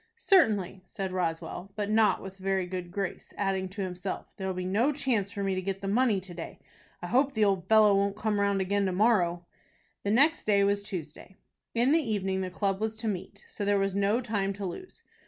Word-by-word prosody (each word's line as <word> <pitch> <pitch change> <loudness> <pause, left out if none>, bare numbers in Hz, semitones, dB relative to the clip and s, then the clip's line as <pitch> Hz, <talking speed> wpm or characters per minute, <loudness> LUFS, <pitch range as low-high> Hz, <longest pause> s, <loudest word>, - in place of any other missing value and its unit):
"Certainly," 210 - +3
said 190 0 -5
Roswell, 180 +1 -3
but 210 -1 -2
not 215 -3 +3
with 190 0 -9
a - - -16
very 190 -1 0
good 180 -1 -5
grace, 195 0 -5
adding 190 -2 -1
to 200 +1 -4
himself; 185 +1 -5
"there'll 190 -1 -3
be 180 0 -3
no 220 +10 +2
chance 250 -9 0
for 200 -1 -4
me 195 -1 0
to 185 - -1
get 195 +1 -4
the 195 - -4
money 220 0 +2
to 185 -1 -11
day. 170 -1 -7 0.5
I - - -2
hope 270 +2 +2
the 215 -1 +4
old 190 -2 0
fellow 215 -2 +6
won't 200 0 +1
come 210 -1 -1
round 200 -1 +2
again 200 +1 +1
to - - 0
morrow." 180 -4 +2 0.6
The 200 - -2
next 285 +9 +3
day 200 -2 +4
was 200 0 +2
Tuesday. 185 -2 -8 0.4
In 240 +4 +3
the 325 - +5
evening 195 -6 -1
the 185 - -3
club 195 +1 -1
was 220 0 -1
to 225 0 -4
meet, 200 0 -5
so 205 - -6
there 205 0 +2
was 195 -1 0
no 200 +4 +2
time 205 -4 -1
to 200 0 -6
lose. 280 - -8
200 Hz, 220 wpm, -29 LUFS, 190-215 Hz, 0.6 s, fellow